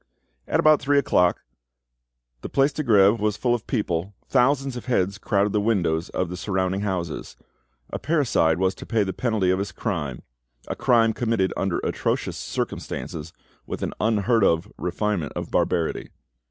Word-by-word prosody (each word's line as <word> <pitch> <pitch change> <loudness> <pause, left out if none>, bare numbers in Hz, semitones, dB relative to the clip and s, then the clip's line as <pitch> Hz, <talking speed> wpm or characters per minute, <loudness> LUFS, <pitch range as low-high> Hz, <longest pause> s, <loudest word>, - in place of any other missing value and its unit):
At - - +1
about 155 -1 +5
three 145 +1 +2
o'clock, 90 -10 +3 1.0
the - - -6
Place 140 +1 +2
de 155 - -2
Greve 105 -4 +5
was 105 0 0
full 120 -1 +1
of 120 -3 -3
people, 100 -4 -2
thousands 135 +1 +2
of 120 - -7
heads 100 -5 0
crowded 100 -1 +1
the 105 - +2
windows 85 -7 0
of 90 - -1
the 90 +1 -6
surrounding 95 0 -1
houses. 90 -5 -3 0.5
A - - -3
parricide 130 - +2
was 95 +1 +1
to - - -11
pay 115 -3 +2
the 95 -1 -3
penalty 110 -4 +1
of 95 - +1
his 100 0 -3
crime—a - - -6
crime 115 -3 +3
committed 110 -6 0
under 95 -3 -1
atrocious - - -1
circumstances, 80 0 -4 0.4
with - - -4
an - - -2
unheard 110 0 +2
of 85 -2 +1
refinement 90 -3 -2
of - - -5
barbarity. 85 -3 0
100 Hz, 160 wpm, -24 LUFS, 90-115 Hz, 1.0 s, about